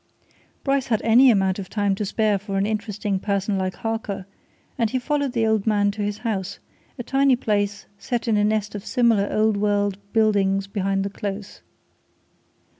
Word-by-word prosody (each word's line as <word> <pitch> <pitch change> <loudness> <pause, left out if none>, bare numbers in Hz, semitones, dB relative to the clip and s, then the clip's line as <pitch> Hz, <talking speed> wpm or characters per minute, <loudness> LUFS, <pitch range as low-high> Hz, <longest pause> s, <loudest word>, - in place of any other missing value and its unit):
Bryce 275 -2 +1
had 220 -3 +1
any 240 +4 +6
amount 195 -3 +2
of 190 - -7
time 205 -2 0
to 205 +2 -2
spare 210 0 +1
for 195 0 -4
an 195 - +1
interesting 210 -2 -2
person 200 0 -1
like 185 -1 -2
Harker, 220 -3 -4 0.5
and 230 -5 0
he 260 - -1
followed 285 0 -1
the 230 -3 +1
old 220 -1 +1
man 205 -2 +3
to 210 +1 -6
his 205 0 -2
house 200 -3 -2 0.4
a 245 - -5
tiny 270 +1 +3
place 205 -4 -1
set 240 -2 -3
in 225 - +3
a 205 - +3
nest 210 0 0
of 205 -2 -6
similar 230 -4 +2
old 215 -1 +2
world 205 -1 0
buildings 200 -3 +2
behind 195 -1 -1
the 200 - -3
Close. 200 0 -6
210 Hz, 180 wpm, -23 LUFS, 200-225 Hz, 0.5 s, any